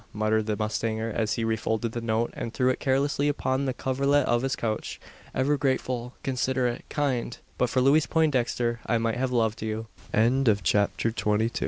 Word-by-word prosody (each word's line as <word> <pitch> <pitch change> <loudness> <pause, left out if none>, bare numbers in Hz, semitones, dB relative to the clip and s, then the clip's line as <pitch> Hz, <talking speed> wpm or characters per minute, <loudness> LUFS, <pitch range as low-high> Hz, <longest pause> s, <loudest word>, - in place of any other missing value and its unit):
muttered 110 +1 +1
the 105 -1 -1
mustanger, 110 +1 -2
as 110 -1 0
he 115 - -2
refolded 110 0 -1
the 120 - -4
note, 115 0 0
and 115 - -5
threw 130 -2 +2
it 130 - 0
carelessly 140 +1 +1
upon 135 -2 0
the 130 - 0
coverlet 140 +2 +1
of 120 0 +2
his 135 0 -1
couch. 110 -2 -3 0.4
"Ever 140 +3 +2
grateful 130 -2 -1
considerate 130 -2 0
kind! 130 -5 -1 0.2
But 125 - +2
for 130 +1 +1
Louise 145 +4 +4
Poindexter, 125 -6 +1
I 115 - +2
might 115 0 -1
have 130 0 -1
loved 115 -3 +1
you!" 110 0 -3 0.8
CHAPTER 105 +4 +1
TWENTY 110 0 +1
THREE. - - -5
120 Hz, 175 wpm, -27 LUFS, 110-130 Hz, 0.8 s, Louise